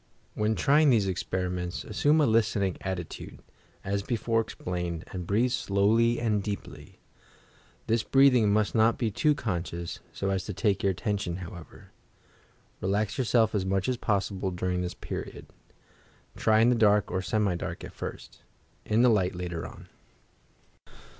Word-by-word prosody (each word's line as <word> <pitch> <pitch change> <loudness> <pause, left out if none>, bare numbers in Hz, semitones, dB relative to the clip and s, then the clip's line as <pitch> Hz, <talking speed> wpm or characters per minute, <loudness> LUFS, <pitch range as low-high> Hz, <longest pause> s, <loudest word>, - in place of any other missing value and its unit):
When 110 +1 0
trying 150 +4 +4
these 110 -6 +4
experiments, 90 -1 -3
assume 145 +9 +2
a - - +4
"listening" 110 -5 +1
attitude, 95 -3 -5 0.5
as 100 +1 -1
before 115 +1 0
explained 90 -5 -4
and 90 -2 -5
breathe 115 +6 +2
slowly 115 +2 +2
and 110 -3 +1
deeply. 100 0 -7 0.9
(This 115 0 +1
breathing 125 -5 +4
must 105 0 +1
not 115 0 +3
be 115 -3 -1
too 150 +8 +2
conscious, 85 - -4
so 100 0 -2
as 95 -1 -1
to 105 - -5
fake 100 -2 +1
your 100 - +2
attention, 100 -2 -2
however.) 90 -2 -10 0.9
Relax 105 +4 -1
yourself 115 -3 +2
as 100 -3 0
much 95 0 0
as 130 - +1
possible 100 -3 -1
during 90 0 -2
this 90 0 -4
period. - - -7 0.9
Try 110 0 +3
in 115 - +5
the 125 - +3
dark 105 -2 +3
or 95 - -1
semi 105 0 0
dark, 85 - -5
at - - -9
first; - - -8 0.4
in 110 +3 +2
the - - +6
light 95 -5 +2
later 90 -2 -4
on. - - -13
105 Hz, 150 wpm, -28 LUFS, 95-115 Hz, 0.9 s, the